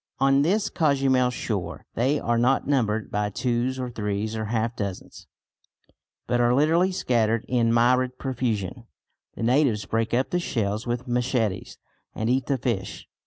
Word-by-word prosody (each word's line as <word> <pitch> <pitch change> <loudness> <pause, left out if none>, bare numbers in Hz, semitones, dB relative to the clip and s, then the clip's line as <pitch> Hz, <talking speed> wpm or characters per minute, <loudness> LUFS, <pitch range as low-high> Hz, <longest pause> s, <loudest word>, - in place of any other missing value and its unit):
On 135 +1 +4
this 200 +8 +1
Cozumel 135 -5 +2
shore 105 -6 -4
they 135 +6 +1
are 120 0 0
not 130 +3 +2
numbered 110 -6 0
by 105 0 0
twos 125 +4 -1
or 125 -1 -4
threes 105 0 -3
or 110 -1 -3
half 115 +1 -1
dozens, 100 -3 -6 1.0
but 120 0 +1
are 120 +1 +3
literally 165 +6 +3
scattered 115 - 0
in 120 -2 +2
myriad 125 +2 +2
profusion. 120 -4 -3 0.5
The - - -5
natives 120 -4 +2
break 115 +3 -1
up 125 +3 0
the 180 - +1
shells 110 - -2
with 120 +2 -3
machetes 120 -4 -1 0.4
and 110 +2 -1
eat 130 0 0
the 140 - +1
fish. 115 -6 -3
120 Hz, 155 wpm, -25 LUFS, 110-130 Hz, 1.0 s, On